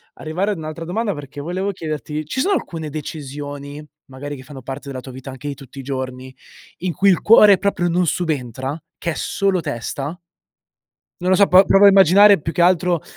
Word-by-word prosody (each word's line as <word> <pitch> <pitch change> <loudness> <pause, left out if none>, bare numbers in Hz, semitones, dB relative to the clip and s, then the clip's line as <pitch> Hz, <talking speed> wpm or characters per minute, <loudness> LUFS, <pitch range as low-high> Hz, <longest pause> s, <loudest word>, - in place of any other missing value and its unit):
arrivare 180 +7 -2
ad 200 - -3
un'altra 155 +1 -6
domanda 205 +5 -2
perché 145 -1 -9
volevo 185 +6 -3
chiederti: 155 - -5
ci 215 - -2
sono 400 +7 +1
alcune 160 - -5
decisioni, 145 -1 -7 0.3
magari 145 +2 -7
che 130 - -11
fanno 135 0 -11
parte 135 +2 -7
della 130 -2 -5
tua 130 0 -10
vita 130 +1 -9
anche 135 +2 -8
di 140 - -4
tutti 135 0 -12
i - - -7
giorni 130 -1 -6 0.4
in 180 +1 -2
cui 195 +4 +1
il 185 - +3
cuore 210 -3 +7
proprio 190 -3 0
non 175 +1 +1
subentra? 140 -5 -2 0.2
Che 170 - -3
è - - -5
solo 195 -2 0
testa? 140 +5 -5 1.0
Non 185 +1 0
lo - - +6
so 200 +1 +5
po 185 +2 +7
provo 195 - +4
a 200 - +10
immaginare 195 +1 +6
più 160 +2 -5
che - - 0
altro 175 -1 +3
155 Hz, 200 wpm, -20 LUFS, 140-185 Hz, 1.0 s, a